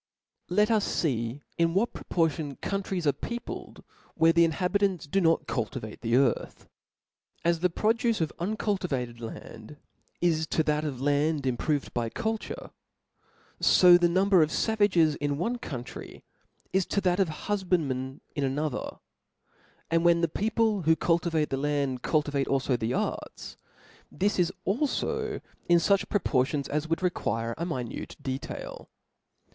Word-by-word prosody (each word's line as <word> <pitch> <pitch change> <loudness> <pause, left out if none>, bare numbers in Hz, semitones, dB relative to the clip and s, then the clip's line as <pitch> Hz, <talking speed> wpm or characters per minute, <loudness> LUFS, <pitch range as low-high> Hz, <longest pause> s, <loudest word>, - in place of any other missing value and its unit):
T 180 +4 +1
E 210 - +6
T 225 - +1
us 210 -4 0
fee 120 -2 -1 0.2
in 165 0 +2
what 225 +5 +1
proportion 160 -4 -1
countries 195 -1 -3
are 145 - +4
4—' 235 - -4
peopkd, - - -8 0.3
where 165 0 +5
the 170 0 +5
inhabitants 180 +3 0
do 195 +7 +1
not 165 -1 +3
culti 115 -5 -2
vate 110 -1 -9
the 115 0 +1
earth. 135 +2 0 0.8
As 170 -1 +3
the 180 +2 +2
produce 225 +5 +1
of 160 -2 -1
uncultivated 175 - -2
land, 115 +3 -9 0.4
is 160 -2 +1
to 160 - +1
that 150 0 0
of 140 -5 -3
land 145 +1 +1
improved 135 +3 -1
by 120 -2 -1
culture; 225 - -4 0.9
fo 180 -1 +7
the 175 -1 +3
number 190 +1 +4
of 155 - +3
favages 185 -7 +2
in 145 -1 -1
one 235 +9 -1
country, 125 - -8 0.5
is 190 -1 +2
to 200 - 0
that 180 0 +1
of 190 -4 +3 0.2
hufbandmen 155 -10 -1
in 145 - -1
another: 140 +1 -2 0.9
and 165 0 +3
when 170 -1 +4
the 170 - +3
peopje 215 +2 0
who 160 0 +5
cultivate 165 -2 +1
the 135 - 0
land, 140 -3 -1
cukivate 145 -2 0
alfo 135 -1 +1
the 115 0 -2
arts, - - -3 0.6
this 200 +1 0
is 180 0 +2
alfo 415 - -1 0.3
in 175 - +7
fuch 195 +4 +2
proportions 140 - +1
as 150 +2 -1
would 165 +1 +1
vt^ 180 -1 0
quire 115 +2 -2
a 170 - -2
minute 125 -8 -5
detail. 130 0 -6
165 Hz, 150 wpm, -28 LUFS, 140-190 Hz, 0.9 s, fo